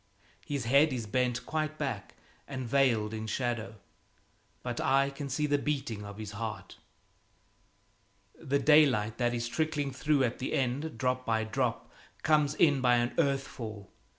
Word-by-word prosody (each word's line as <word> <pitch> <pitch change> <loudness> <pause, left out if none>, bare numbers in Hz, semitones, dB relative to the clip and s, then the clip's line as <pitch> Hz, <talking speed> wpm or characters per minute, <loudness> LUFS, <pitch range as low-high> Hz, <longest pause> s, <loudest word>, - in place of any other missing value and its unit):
His 140 -5 -3
head 140 +5 +5
is 120 -3 -3
bent 125 +2 0
quite 155 -1 -2
back - - -4 0.3
and 130 -3 -5
veiled 115 -5 +2
in 110 0 -4
shadow, 115 -1 -2 0.9
but - - -3
I 135 +1 +3
can 140 0 -6
see 150 +3 0
the 145 -1 +2
beating 135 -8 -2
of 100 0 -9
his 110 -1 -6
heart. 110 -1 -6 1.6
The 140 -3 -1
daylight 135 -8 +4
that 120 -1 +1
is 120 0 -2
trickling 150 0 -1
through 140 +2 +1
at 120 -1 -1
the 130 - -3
end, 135 +2 -1
drop 125 +1 0
by 110 -2 0
drop, 115 +1 -1 0.4
comes 150 -1 +3
in 145 -5 +4
by 125 -1 +4
an 120 0 +1
earth 140 -3 +2
fall. 110 -5 -8
130 Hz, 155 wpm, -30 LUFS, 115-140 Hz, 1.6 s, head